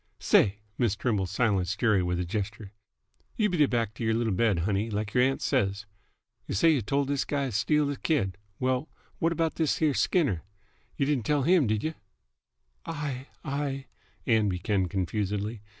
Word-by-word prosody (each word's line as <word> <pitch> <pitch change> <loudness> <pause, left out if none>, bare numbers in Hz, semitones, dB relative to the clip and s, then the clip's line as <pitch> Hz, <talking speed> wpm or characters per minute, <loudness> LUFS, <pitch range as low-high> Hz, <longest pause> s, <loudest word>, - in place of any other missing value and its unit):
"Say!" 100 -1 +3 0.2
Miss 115 -5 +2
Trimble 105 -3 0
silenced 100 -2 0
Jerry 110 -5 +3
with 90 0 -1
a 90 - -1
gesture. 100 +2 -4 0.6
"You 210 -3 +2
beat 175 - -1
't 140 - +2
back 115 -3 0
t' 115 - -6
y'r 110 0 +2
little 115 -2 0
bed, 105 -1 +2
honey, 105 +2 0
like 105 -1 -3
y'r 125 - +4
aunt 135 +1 +1
says. 100 -6 0 0.6
Y' - - -3
say 165 - +5
y' 145 - +2
told 140 +5 0
this 140 -1 0
guy 140 -1 -1
t' 130 - -3
steal 150 +9 +2
th' 135 - -11
kid. 100 - 0 0.2
Well, 130 +3 0 0.3
what 165 - +2
about 165 -1 -1
this 160 -3 +1
here 155 -3 +2
Skinner? 135 - +1 0.6
Y' 140 - +2
didn't 135 -6 0
tell 145 -2 +2
him, 170 -3 +4
did 105 0 0
y'?" 160 - -1 0.9
"I 145 -4 -4 0.2
I 140 -1 -2 0.2
" - - -35
Ann 110 -3 +3
began 95 +1 0
confusedly. 100 +3 -2
115 Hz, 185 wpm, -28 LUFS, 100-140 Hz, 0.9 s, say